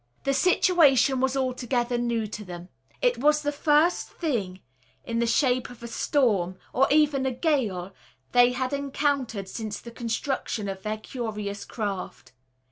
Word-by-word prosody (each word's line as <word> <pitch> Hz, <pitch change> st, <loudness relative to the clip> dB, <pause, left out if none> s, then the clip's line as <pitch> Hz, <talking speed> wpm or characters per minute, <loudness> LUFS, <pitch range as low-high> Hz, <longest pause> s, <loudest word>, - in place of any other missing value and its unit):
The 275 Hz, -, +1 dB
situation 280 Hz, -5 st, +4 dB
was 265 Hz, +1 st, +1 dB
altogether 250 Hz, -2 st, -1 dB
new 235 Hz, -2 st, 0 dB
to 210 Hz, 0 st, -7 dB
them. 175 Hz, -1 st, -9 dB, 0.3 s
It -, -, +2 dB
was 300 Hz, +1 st, +3 dB
the 290 Hz, -, 0 dB
first 300 Hz, +3 st, +2 dB
thing 205 Hz, -, -3 dB, 0.4 s
in 230 Hz, 0 st, -2 dB
the 235 Hz, -, +1 dB
shape 250 Hz, +1 st, +2 dB
of 245 Hz, -1 st, -13 dB
a -, -, -5 dB
storm, 210 Hz, -8 st, +1 dB, 0.2 s
or 265 Hz, +2 st, +4 dB
even 290 Hz, -2 st, +3 dB
a -, -, 0 dB
gale, 230 Hz, -, -1 dB, 0.4 s
they 245 Hz, 0 st, +5 dB
had 255 Hz, +1 st, -2 dB
encountered 280 Hz, -7 st, -1 dB
since 215 Hz, +1 st, -5 dB
the 235 Hz, -, -10 dB
construction 230 Hz, -2 st, -3 dB
of 190 Hz, -1 st, -5 dB
their 215 Hz, +2 st, -3 dB
curious 210 Hz, -4 st, -5 dB
craft. 200 Hz, -5 st, -5 dB
245 Hz, 150 wpm, -26 LUFS, 215-280 Hz, 0.4 s, they